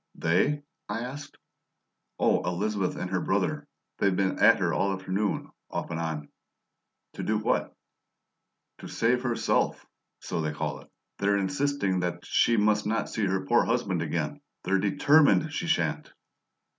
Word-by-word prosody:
"They?" 140 - +1 0.3
I 110 +2 -2
asked. 135 +4 -7 0.8
"Oh, - - +3
Elizabeth 95 +2 -1
and 90 - -5
her 95 -2 0
brother. - - -1 0.3
They've 100 -2 +2
been 95 0 0
at - - +7
her - - 0
all 100 0 +1
afternoon 95 +2 -2 0.2
off - - -4
and 80 - -3
on." 80 -3 -3 0.9
"To - - -6
do 110 - 0
what?" 105 - -1 1.0
"To - - -8
'save 125 +2 +1
herself,' 120 -2 0 0.3
so 85 - -3
they 75 -1 -2
call 75 - -3
it. - - -17 0.3
They're 100 0 +2
insisting 135 -2 0
that 85 -1 -3
she 115 - +3
must 105 0 +2
not 115 +1 -1
see 110 -3 0
her 95 0 -1
poor 120 0 +4
husband 105 -8 0
again. 80 -3 -2 0.2
They're 95 +1 +1
DETERMINED 105 - +4
she - - -3
sha'n't." - - 0
100 Hz, 150 wpm, -27 LUFS, 90-115 Hz, 1.0 s, at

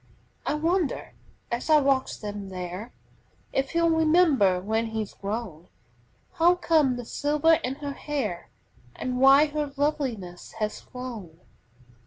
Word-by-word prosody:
I - - +1
wonder, 330 +1 -1 0.4
as 240 +6 -3
I 305 -1 +7
watch 270 -2 0
them 205 -2 -6
there, 185 +4 -6 0.6
If 270 0 0
he'll 335 0 +2
remember, 310 - +4
when 220 +4 -1
he's 220 -2 -4
grown, 200 -5 -5 0.7
How 345 +2 +4
came 310 -7 +2
the 245 -1 -6
silver 300 +5 +2
in 260 +2 -2
her 285 -1 -5
hair 265 - -4 0.5
And 250 0 -3
why 270 +3 +7
her 295 -1 -3
loveliness 255 - -2
has 215 -1 -3
flown? 220 -10 -9
260 Hz, 130 wpm, -26 LUFS, 210-300 Hz, 0.7 s, I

